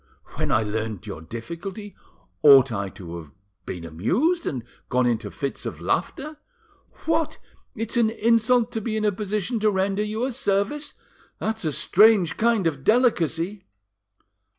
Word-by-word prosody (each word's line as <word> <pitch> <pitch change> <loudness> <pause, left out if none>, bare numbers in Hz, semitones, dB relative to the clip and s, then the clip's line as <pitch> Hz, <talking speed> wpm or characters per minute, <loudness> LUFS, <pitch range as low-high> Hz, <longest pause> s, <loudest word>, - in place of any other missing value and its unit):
When - - -2
I 110 - +3
learned 110 -1 -3
your 100 -7 -7
difficulty, 170 - -7 0.5
ought 135 -3 +8
I 100 -3 -2
to 85 -3 -9
have 80 -4 -11 0.4
been 90 -3 -5
amused, 210 - 0
and 125 -5 -3 0.3
gone 125 0 +2
into 120 -2 0
fits 140 -2 -5
of - - -5
laughter? 305 +2 -2 0.7
What! 320 -1 0 0.4
it's 225 +2 -3
an 230 -2 +4
insult 230 +2 +2
to 225 - -3
be 220 0 -2
in 215 - 0
a 210 - +3
position 210 +3 -2
to 215 0 +3
render 195 +1 0
you 215 +3 -1
a 265 - -2
service! 225 +5 -1 0.4
That's 220 -3 -3
a 155 - +1
strange 200 +2 +4
kind 230 -4 +2
of 145 -5 -1
delicacy!" 195 - +1
200 Hz, 150 wpm, -24 LUFS, -, 0.7 s, ought